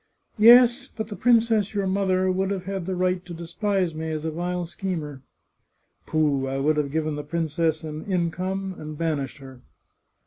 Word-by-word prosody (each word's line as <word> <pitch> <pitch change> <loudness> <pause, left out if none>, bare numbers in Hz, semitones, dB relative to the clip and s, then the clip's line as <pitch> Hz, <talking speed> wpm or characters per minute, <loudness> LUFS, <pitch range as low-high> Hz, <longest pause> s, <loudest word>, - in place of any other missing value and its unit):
" - - -42
Yes, 245 +2 +7
but 220 -4 -6
the 210 - -5
princess, 225 -3 +2
your 200 -1 0
mother, 185 -1 +1
would 190 +1 0
have 190 -2 -3
had 195 -2 -4
the 190 - -1
right 180 0 0
to 175 -1 -8
despise 180 +1 -1
me 160 +1 -4
as 155 0 -3
a 160 - -1
vile 175 +2 -3
schemer." 165 -6 -5 0.4
" - - -47
Pooh! 145 -4 +1
I 135 0 -2
would 150 +3 +1
have 145 -2 0
given 155 +1 -1
the 150 - -4
princess 160 0 -1
an 155 0 -6
income, 185 +1 -2
and 155 0 -7
banished 150 -5 -2
her." 130 -3 -12
175 Hz, 185 wpm, -25 LUFS, 155-195 Hz, 0.4 s, Yes